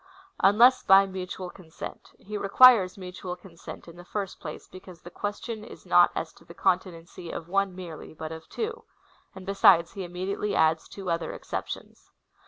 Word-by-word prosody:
Unless 235 Hz, +6 st, +6 dB
by 195 Hz, -1 st, +6 dB
mutual 185 Hz, -1 st, -6 dB
consent. 165 Hz, -4 st, -10 dB
He 210 Hz, +2 st, -9 dB
requires 205 Hz, -1 st, +6 dB
mutual 180 Hz, -1 st, -7 dB
consent, 175 Hz, -2 st, -12 dB
in 170 Hz, 0 st, -12 dB
the 175 Hz, -, -11 dB
first 195 Hz, 0 st, -5 dB
place, 150 Hz, -3 st, -8 dB
because 185 Hz, -2 st, -13 dB
the 175 Hz, -, -11 dB
question 210 Hz, +3 st, -5 dB
is 225 Hz, -, -12 dB
not -, -, +6 dB
as -, -, -4 dB
to -, -, -20 dB
the -, -, -14 dB
conti 185 Hz, 0 st, +1 dB
nency 170 Hz, 0 st, -10 dB
of 165 Hz, -, -6 dB
one 195 Hz, 0 st, 0 dB
merely, 175 Hz, -4 st, -9 dB
but 160 Hz, 0 st, -6 dB
of 160 Hz, 0 st, -9 dB
two; 450 Hz, +2 st, -4 dB, 0.5 s
and 190 Hz, -1 st, -10 dB
besides, 195 Hz, -4 st, +5 dB
he 195 Hz, -, -6 dB
immedi 185 Hz, +2 st, -4 dB
ately 210 Hz, -1 st, -2 dB
adds 160 Hz, 0 st, +2 dB
two 190 Hz, -3 st, -5 dB
other 165 Hz, 0 st, -2 dB
exceptions. -, -, -7 dB
185 Hz, 180 wpm, -27 LUFS, 175-200 Hz, 0.5 s, Unless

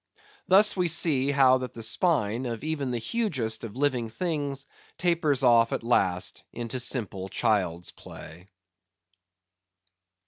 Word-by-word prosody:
Thus 205 Hz, +3 st, +5 dB
we 180 Hz, -2 st, +1 dB
see 150 Hz, -5 st, +2 dB
how 130 Hz, -2 st, +4 dB
that 130 Hz, -1 st, -7 dB
the 115 Hz, -, -5 dB
spine 125 Hz, -, +1 dB
of 115 Hz, +1 st, -5 dB
even 150 Hz, -4 st, -3 dB
the 120 Hz, -, -2 dB
hugest 125 Hz, -, -2 dB
of 115 Hz, 0 st, -8 dB
living 130 Hz, -5 st, 0 dB
things 145 Hz, 0 st, -3 dB, 0.3 s
tapers 165 Hz, -6 st, +1 dB
off 115 Hz, -2 st, +4 dB
at -, -, -3 dB
last 95 Hz, -6 st, 0 dB
into 120 Hz, +2 st, -5 dB
simple 105 Hz, -6 st, -2 dB
child's 90 Hz, -6 st, -1 dB
play. 85 Hz, +4 st, -12 dB
130 Hz, 130 wpm, -26 LUFS, 110-150 Hz, 0.3 s, Thus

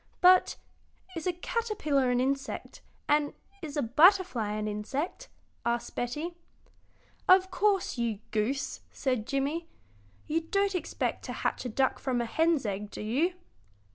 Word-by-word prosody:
"But 365 Hz, 0 st, +6 dB, 0.6 s
is 330 Hz, +1 st, -3 dB
a -, -, +3 dB
caterpillar 350 Hz, -, 0 dB
an 245 Hz, 0 st, +2 dB
insect, 275 Hz, +1 st, -2 dB, 0.3 s
and 295 Hz, 0 st, +2 dB, 0.3 s
is 300 Hz, -3 st, -6 dB
a 290 Hz, -, +2 dB
butterfly 295 Hz, -, +4 dB
an 215 Hz, 0 st, -2 dB
insect?" 220 Hz, -, -3 dB, 0.3 s
asked 235 Hz, 0 st, -1 dB
Betty. 295 Hz, +8 st, -3 dB, 1.0 s
"Of 375 Hz, 0 st, +6 dB
course, 390 Hz, -9 st, +1 dB
you 230 Hz, -3 st, 0 dB
goose," 225 Hz, +6 st, -1 dB
said 255 Hz, -5 st, -1 dB
Jimmie; 285 Hz, +5 st, -1 dB, 0.6 s
"you 325 Hz, +2 st, 0 dB
don't 395 Hz, +4 st, +1 dB
expect 360 Hz, -, -2 dB
to -, -, -4 dB
hatch -, -, -2 dB
a -, -, -1 dB
duck 265 Hz, +4 st, +1 dB
from 255 Hz, -2 st, -1 dB
a 235 Hz, -, 0 dB
hen's 320 Hz, +2 st, +2 dB
egg, 205 Hz, 0 st, -3 dB
do -, -, -7 dB
you?" 280 Hz, -, +1 dB
280 Hz, 140 wpm, -29 LUFS, 240-350 Hz, 1.0 s, But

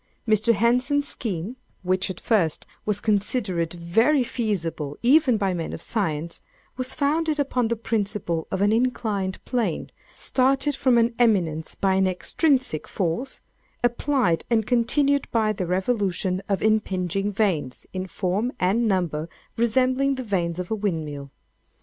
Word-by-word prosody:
Mr. 220 Hz, +1 st, +4 dB
Henson's 250 Hz, +7 st, +2 dB
scheme 210 Hz, +2 st, -3 dB, 0.3 s
(which 185 Hz, +1 st, 0 dB
at 185 Hz, -, -5 dB
first 180 Hz, -9 st, +1 dB, 0.2 s
was 210 Hz, -2 st, +1 dB
considered 205 Hz, -5 st, 0 dB
very 225 Hz, -, +2 dB
feasible 170 Hz, -, -3 dB
even 260 Hz, -1 st, +5 dB
by 195 Hz, -2 st, 0 dB
men 170 Hz, -2 st, -4 dB
of -, -, -6 dB
science,) 165 Hz, -7 st, -2 dB, 0.3 s
was 255 Hz, +1 st, -2 dB
founded 305 Hz, +1 st, +1 dB
upon 255 Hz, -4 st, +1 dB
the 235 Hz, -, 0 dB
principle 205 Hz, -7 st, -2 dB
of 190 Hz, -, 0 dB
an 205 Hz, -, +3 dB
inclined 220 Hz, -5 st, 0 dB
plane, 230 Hz, -10 st, -2 dB, 0.2 s
started 270 Hz, +2 st, +1 dB
from 255 Hz, -3 st, +3 dB
an 235 Hz, +1 st, +3 dB
eminence 170 Hz, -9 st, +2 dB
by 195 Hz, -1 st, +1 dB
an 190 Hz, 0 st, +3 dB
extrinsic 250 Hz, -, +1 dB
force, 195 Hz, +9 st, -2 dB, 0.4 s
applied 240 Hz, -, +1 dB
and 225 Hz, -3 st, +2 dB
continued 275 Hz, +4 st, +2 dB
by 220 Hz, -2 st, +1 dB
the 185 Hz, -3 st, -3 dB
revolution 185 Hz, -1 st, 0 dB
of 195 Hz, -2 st, 0 dB
impinging 195 Hz, -2 st, 0 dB
vanes, 180 Hz, -, -1 dB
in 185 Hz, 0 st, -3 dB
form 195 Hz, +6 st, -1 dB
and 210 Hz, +6 st, +2 dB
number 170 Hz, -5 st, -1 dB, 0.3 s
resembling 255 Hz, +4 st, +2 dB
the 260 Hz, -, -4 dB
vanes 175 Hz, -6 st, -1 dB
of 180 Hz, +1 st, -5 dB
a -, -, +2 dB
windmill. 155 Hz, -9 st, -3 dB
210 Hz, 140 wpm, -24 LUFS, 180-245 Hz, 0.4 s, even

